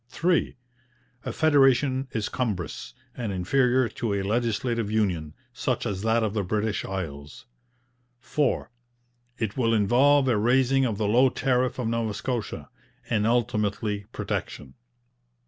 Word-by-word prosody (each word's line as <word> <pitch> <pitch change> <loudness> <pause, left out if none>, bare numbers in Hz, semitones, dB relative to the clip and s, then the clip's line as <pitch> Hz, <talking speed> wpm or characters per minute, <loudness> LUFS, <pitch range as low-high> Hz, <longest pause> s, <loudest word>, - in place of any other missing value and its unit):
3. 170 +6 0 0.7
A - - -2
federation 135 -3 +3
is 110 -3 -2
cumbrous, 90 - -4 0.2
and 115 -4 -3
inferior 125 +7 +2
to 110 -1 -3
a 100 - -1
legislative 115 +1 -1
union, 90 -8 -1 0.2
such 130 0 -2
as 100 -4 -3
that 115 +1 +2
of 105 -2 -1
the 105 - 0
British 105 +2 -1
Isles. 75 -7 -6 0.7
4. 135 +1 -1 0.7
It 110 -4 -3
will 115 -3 +2
involve 130 +7 +4
a 120 -4 +3
raising 130 +4 +3
of 110 -5 -1
the 105 -1 0
low 125 +5 +5
tariff 130 -1 0
of 125 -3 -2
Nova 115 -2 -1
Scotia, 120 -3 -4 0.4
and 110 -2 +2
ultimately 105 -3 0
protection. 70 -3 -5
115 Hz, 130 wpm, -26 LUFS, 105-130 Hz, 0.7 s, low